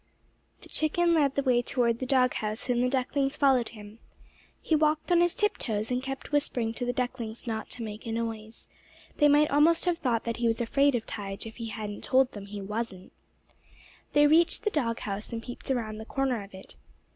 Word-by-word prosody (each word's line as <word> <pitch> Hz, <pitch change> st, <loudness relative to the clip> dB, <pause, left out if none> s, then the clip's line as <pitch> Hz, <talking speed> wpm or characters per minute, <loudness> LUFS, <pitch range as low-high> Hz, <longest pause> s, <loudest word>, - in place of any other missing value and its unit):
The -, -, -14 dB
chicken 340 Hz, +2 st, +2 dB
led 285 Hz, -4 st, +2 dB
the 280 Hz, -, +1 dB
way 250 Hz, -2 st, +3 dB
toward 235 Hz, -1 st, 0 dB
the 255 Hz, -, -3 dB
dog 255 Hz, -1 st, +3 dB
house, 215 Hz, +3 st, -4 dB
and 245 Hz, 0 st, +2 dB
the 250 Hz, -, +2 dB
ducklings 270 Hz, +1 st, 0 dB
followed 265 Hz, -5 st, +3 dB
him. 210 Hz, 0 st, -12 dB, 0.6 s
He 320 Hz, -, +1 dB
walked 310 Hz, +2 st, +1 dB
on 345 Hz, -1 st, +5 dB
his 350 Hz, -1 st, +2 dB
tip 420 Hz, 0 st, +1 dB
toes, 215 Hz, 0 st, -2 dB
and 250 Hz, 0 st, 0 dB
kept 270 Hz, +1 st, -6 dB
whispering 245 Hz, -6 st, 0 dB
to 245 Hz, +2 st, -4 dB
the 245 Hz, -, 0 dB
ducklings 245 Hz, -3 st, -4 dB
not 220 Hz, -2 st, -4 dB
to 240 Hz, -, -4 dB
make 215 Hz, 0 st, -7 dB
a -, -, -3 dB
noise. 225 Hz, -1 st, -5 dB, 0.5 s
They 295 Hz, -, +5 dB
might 295 Hz, +1 st, +4 dB
almost 315 Hz, +5 st, +4 dB
have 350 Hz, -2 st, +1 dB
thought 235 Hz, -4 st, 0 dB
that 230 Hz, -1 st, -3 dB
he 235 Hz, 0 st, +1 dB
was 225 Hz, 0 st, +1 dB
afraid 275 Hz, +4 st, +2 dB
of 225 Hz, -, -2 dB
Tige 200 Hz, -2 st, -5 dB
if 225 Hz, -, -9 dB
he 230 Hz, -1 st, -5 dB
hadn't 210 Hz, -1 st, -6 dB
told 260 Hz, 0 st, +3 dB
them 200 Hz, -1 st, -9 dB
he 205 Hz, 0 st, -6 dB
wasn't. 205 Hz, -2 st, -5 dB, 1.0 s
They 295 Hz, 0 st, +6 dB
reached 330 Hz, +6 st, +4 dB
the 425 Hz, -, +1 dB
dog 235 Hz, -, -1 dB
house 205 Hz, +2 st, -5 dB
and 230 Hz, -1 st, -4 dB
peeped 245 Hz, +3 st, -9 dB
around 220 Hz, -5 st, -2 dB
the 220 Hz, -, -7 dB
corner 265 Hz, -3 st, -1 dB
of 195 Hz, -1 st, -13 dB
it. 190 Hz, -, -12 dB
245 Hz, 215 wpm, -28 LUFS, 220-280 Hz, 1.0 s, They